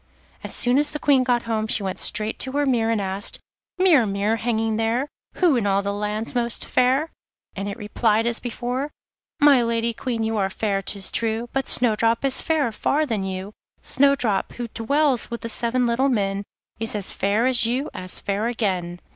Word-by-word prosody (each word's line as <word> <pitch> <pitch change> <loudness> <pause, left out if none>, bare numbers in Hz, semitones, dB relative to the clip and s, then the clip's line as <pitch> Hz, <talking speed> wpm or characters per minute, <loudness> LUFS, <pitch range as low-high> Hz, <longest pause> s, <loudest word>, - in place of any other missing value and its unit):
As - - -6
soon 245 +2 +3
as 295 0 +2
the 300 - -4
Queen 280 -3 +3
got 245 -2 +1
home 220 -1 -1
she 215 - +1
went 190 -1 -4
straight 215 +1 0
to 260 - -1
her 290 0 +1
mirror, 230 -4 +1
and 225 - +1
asked: 195 0 -1 0.4
'Mirror, 335 - +4
mirror, 200 +2 0
hanging 225 -1 -1
there, 230 +5 0 0.3
Who 345 -6 +3
in 225 -4 0
all 200 0 +2
the 200 0 -2
land's 210 +2 -2
most 235 -1 -1
fair?' 265 +6 +2 0.4
and 200 +1 -4
it 200 - -6
replied 215 +1 +1
as 235 0 +1
before: 250 +3 -3 0.5
'My 290 -4 +6
Lady 230 0 0
Queen, 230 -1 -3
you 220 0 -1
are 195 -2 +1
fair, 200 0 -1
'tis 195 -1 -3
true, 230 +1 -1
But 270 -1 -1
Snowdrop 230 +1 +2
is 270 - 0
fairer 310 -7 +1
far 295 +7 0
than 220 -8 -2
you. 190 +2 -5 0.3
Snowdrop, 265 -7 +2
who 240 -1 -5
dwells 265 +2 0
with 235 -1 -5
the 230 - -5
seven 240 +2 0
little 245 +4 +2
men, 200 -4 -1 0.3
Is 225 -1 -2
as 205 -2 -2
fair 205 +4 +1
as 245 -3 +4
you, 260 +5 -2
as 185 0 -4
fair 200 +3 -2
again. 185 -7 -2
230 Hz, 195 wpm, -23 LUFS, 210-255 Hz, 0.5 s, My